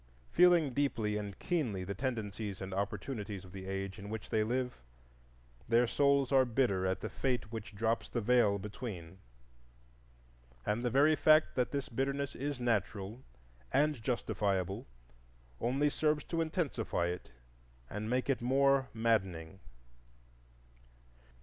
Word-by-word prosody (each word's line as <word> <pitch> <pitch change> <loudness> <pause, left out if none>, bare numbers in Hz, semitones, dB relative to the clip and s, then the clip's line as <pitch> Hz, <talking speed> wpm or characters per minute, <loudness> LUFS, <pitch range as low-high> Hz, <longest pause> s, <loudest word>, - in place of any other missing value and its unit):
Feeling 170 -6 +5
deeply 115 -7 0
and 105 -2 -4
keenly 125 - -1
the 100 +2 -4
tendencies 105 -4 -3
and 95 0 -5
opportunities 100 0 -3
of 90 - -13
the 95 0 -8
age 95 +1 -4
in 100 +1 -8
which 110 0 -6
they 110 -2 +3
live, 125 +2 -2 0.9
their 120 +1 +5
souls 140 +2 +3
are 135 -1 +6
bitter 115 -7 +1
at 95 0 -1
the - - -3
fate 125 -5 -1
which 110 -2 -7
drops 115 +2 0
the 120 - -1
Veil 115 -3 +4
between; 95 -4 -7 1.5
and 105 +3 0
the 125 - +1
very 145 +5 +5
fact 155 +1 +5
that 125 -2 +1
this 140 -2 -2
bitterness 140 +3 -2
is 140 -1 -3
natural 110 -1 -1 0.5
and 145 -2 +2
justifiable 100 -5 -1 0.7
only 135 +5 +2
serves 150 0 +1
to 165 -1 -1
intensify 155 - -1
it 90 +1 -4 0.6
and 105 +8 -4
make 125 +1 0
it 135 -3 +1
more 135 +1 +3
maddening. 95 -6 0
115 Hz, 135 wpm, -33 LUFS, 100-135 Hz, 1.5 s, are